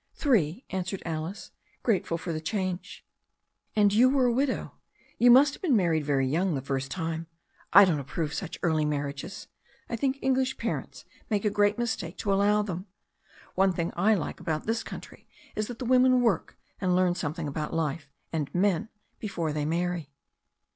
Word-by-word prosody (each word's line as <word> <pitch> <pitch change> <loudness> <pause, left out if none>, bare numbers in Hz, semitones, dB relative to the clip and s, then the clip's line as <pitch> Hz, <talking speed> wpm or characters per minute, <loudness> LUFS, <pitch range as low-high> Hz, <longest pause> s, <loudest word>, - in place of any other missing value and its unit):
"Three," 220 - +1
answered 190 +1 -3
Alice, 165 +4 -5 0.3
grateful 190 -7 +1
for 170 0 -4
the 155 - -3
change. 185 +1 -3 0.7
"And 205 -1 +4
you 245 +4 +6
were 265 -1 +3
a 240 - +3
widow. 265 +2 0 0.5
You 245 - +6
must 270 +4 +7
have - - -11
been 310 -9 +3
married 165 -6 +2
very 140 -2 +2
young 170 +5 +1
the 135 - -2
first 135 -1 -2
time. 165 0 -3 0.4
I 200 +3 +9
dop't 165 -5 +1
approve 145 +3 -3
such 185 - -4
early 160 -3 +2
mar 150 -1 0
riages. 160 +7 -8 0.4
I 235 - -3
think 265 +3 0
English 265 0 +1
parents - - -4 0.2
make 210 -2 0
a 210 - +3
great 205 +1 +2
mistake 215 -7 -3
to 200 -2 0
allow 205 +2 +3
them. 185 -1 -5 0.7
One 190 0 +3
thing 170 -1 -2
I 215 +5 +4
like 175 - -4
about 155 -2 -2
this 225 +1 0
country - - -10 0.3
is 215 0 -1
that 245 - -7
the 255 - -5
women 255 0 +5
work, 220 -9 0 0.2
and 180 -2 +1
learn 180 -1 +3
something 165 -2 -3
about 150 +1 -3
life 150 -2 -2 0.2
and 150 -4 -1
men 190 +1 +2 0.3
before 170 -7 -2
they 150 -1 -1
marry." 170 -1 -1
185 Hz, 180 wpm, -28 LUFS, 160-220 Hz, 0.7 s, I